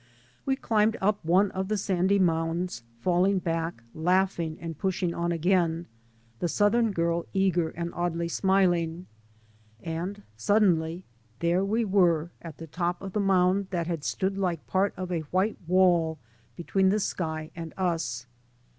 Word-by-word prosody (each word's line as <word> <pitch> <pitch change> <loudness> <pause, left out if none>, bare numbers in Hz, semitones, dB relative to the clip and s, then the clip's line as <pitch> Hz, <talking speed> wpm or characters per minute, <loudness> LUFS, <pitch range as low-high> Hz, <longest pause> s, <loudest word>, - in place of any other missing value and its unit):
We 270 - +3
climbed 220 -3 +1
up 205 0 +1
one 185 +5 +3
of 190 0 -3
the 215 +1 0
sandy 190 0 +1
mounds, 165 -3 0 0.2
falling 185 +2 +2
back, 165 -7 -2
laughing 175 -1 +1
and 165 -1 -6
pushing 180 +1 -1
on 170 0 -1
again, 170 -1 +1 0.5
the - - 0
southern 215 +5 +2
girl 170 -2 0
eager 180 -4 +2
and 170 +1 -5
oddly 170 -1 -1
smiling. 175 -2 +1 0.8
And 175 +5 -4
suddenly 175 - +2 0.3
there 170 +3 +1
we 220 +4 +1
were 175 -5 +2
at 165 -4 -9
the 165 - -8
top 175 +2 -2
of 195 -1 -7
the 210 - 0
mound 190 0 +3
that 175 -3 -1
had 165 -3 -3
stood 195 +4 -1
Uke 180 -5 -1
part 195 +2 +1
of 185 0 -4
a 170 - 0
white 190 +4 0
wall 175 -3 +3 0.4
between 190 +2 +1
the 210 +2 +2
sky 160 -5 -3
and 165 -1 -6
us. 165 -10 -1
180 Hz, 150 wpm, -27 LUFS, 165-195 Hz, 0.8 s, We